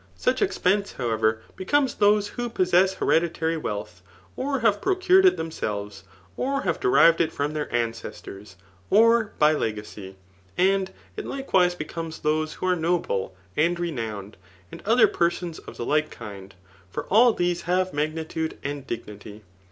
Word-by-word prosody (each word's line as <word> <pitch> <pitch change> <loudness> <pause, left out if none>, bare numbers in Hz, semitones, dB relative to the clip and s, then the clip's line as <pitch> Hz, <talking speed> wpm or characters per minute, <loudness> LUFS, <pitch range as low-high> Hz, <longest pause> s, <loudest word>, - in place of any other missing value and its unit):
Such - - 0
expenseti 200 - +1
howev^, 110 -2 0 0.2
becomes 265 +7 +1
those 205 0 +3
who 240 +2 -4
possess 185 -2 +2
harediiary 165 -2 0
vadtb, 100 -6 -5 0.3
or 275 -1 -2
have 210 -3 +2
procured 375 0 +4
it 370 - +3
themselves, 105 - -5 0.3
or 275 +2 -1
have - - -1
derived 170 - +5
it 160 - +1
from 145 +1 -2
their 150 -1 -3
ancestors^ 110 -4 -5 0.3
or 230 +1 +4
by 150 0 +5
legacy. 105 -6 -4 0.4
And 190 +1 +2 0.3
it - - -5
likawiae 185 -10 +1
beoofties 160 +1 -6
those 155 +1 0
who - - -6
are 185 -1 +3
noble 160 - -1 0.2
and 170 +3 +1
renowned, 110 - -4 0.3
and - - -10
oifaer 225 +2 +4
persons 170 -1 -1
of - - -12
the 120 - -4
like 155 +3 +1
kind; 100 -2 -10 0.3
for - - -4
all 235 +4 +5
these 175 -4 -1
have 185 +1 +1
magnitude 160 +2 -3
and 140 -1 -5
dignity. 105 -1 -8
165 Hz, 145 wpm, -25 LUFS, -, 0.4 s, derived